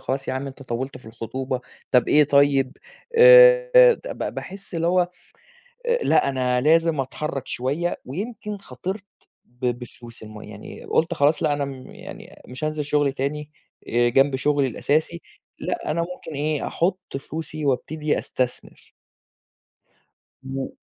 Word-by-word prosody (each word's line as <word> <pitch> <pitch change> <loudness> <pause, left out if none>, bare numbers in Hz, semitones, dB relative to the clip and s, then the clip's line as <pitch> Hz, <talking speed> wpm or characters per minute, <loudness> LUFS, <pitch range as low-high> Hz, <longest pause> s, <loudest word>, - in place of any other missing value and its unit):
"خلاص 135 +1 -3
يا - - 0
عَم 135 +1 -3
أنت 135 0 -9
طوّلت 130 +2 -4
في 120 - -18
الخطوبة، 130 +3 -4 0.3
طَب 125 -2 +4
إيه 150 0 +6
طيب؟"، 140 -1 +3 0.4
آآ، - - +8
د - - -10
ب - - -7
ب - - -3
باحس 195 -1 -8
اللي 165 0 0
هو 180 0 +3 0.8
آآ، 480 0 +2
لأ، - - +3
أنا 125 -2 0
لازم 160 +1 +3
أتحرّك 135 +1 -4
شوية 145 +8 -2
ويمكن 210 - -5
خاطرت 190 +6 -6 0.4
ب 125 +1 -6
بفلوس 120 -1 -6
الم 110 0 -10
يعني 105 0 -10
قُلت 165 +2 +1
خلاص 150 0 +2
لأ، - - +2
أنا 145 -1 -1
م 135 -2 -8
يعني - - -12
مش 125 +4 -6
هانزل 155 -1 -2
شُغل 145 -1 +1
تاني 145 +2 -3 0.4
آآ، 120 +1 +3
جنب 135 +2 +3
شُغلي 145 +1 +1
الأساسي 155 +7 -1 0.4
لأ، - - -3
أنا 160 +2 0
ممكن 170 -1 -6
إيه، 150 +1 -1
أحُط 185 +3 0 0.2
فلوسي 155 0 -6
وأبتدي 150 +3 0
أستثمر. 125 -1 -4 1.5
م 135 0 -4
145 Hz, 150 wpm, -23 LUFS, 130-165 Hz, 1.5 s, آآ